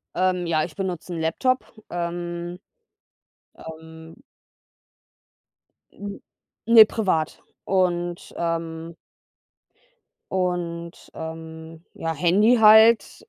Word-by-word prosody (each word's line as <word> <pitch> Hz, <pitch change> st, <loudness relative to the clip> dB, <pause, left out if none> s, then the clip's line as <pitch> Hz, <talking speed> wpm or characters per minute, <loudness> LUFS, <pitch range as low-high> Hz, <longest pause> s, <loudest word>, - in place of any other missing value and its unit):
Ähm, 180 Hz, -1 st, 0 dB
ja, 155 Hz, -2 st, +1 dB
ich 155 Hz, -2 st, -7 dB
benutze 180 Hz, -2 st, -4 dB
'n 165 Hz, -, -4 dB
Laptop. 255 Hz, +11 st, 0 dB, 0.2 s
Ähm. 175 Hz, 0 st, -5 dB, 1.0 s
Ähm. 160 Hz, +5 st, -12 dB, 1.7 s
Hm, 200 Hz, 0 st, -8 dB, 0.5 s
ne, 225 Hz, -1 st, +9 dB
privat 185 Hz, -9 st, -2 dB, 0.2 s
und, 175 Hz, -2 st, -1 dB
ähm 165 Hz, 0 st, -4 dB, 1.4 s
und, 175 Hz, -2 st, -3 dB
ähm 160 Hz, 0 st, -9 dB
ja, 165 Hz, 0 st, -3 dB
Handy 195 Hz, +10 st, +3 dB
halt. 220 Hz, +1 st, +5 dB
175 Hz, 80 wpm, -23 LUFS, 160-190 Hz, 1.7 s, ne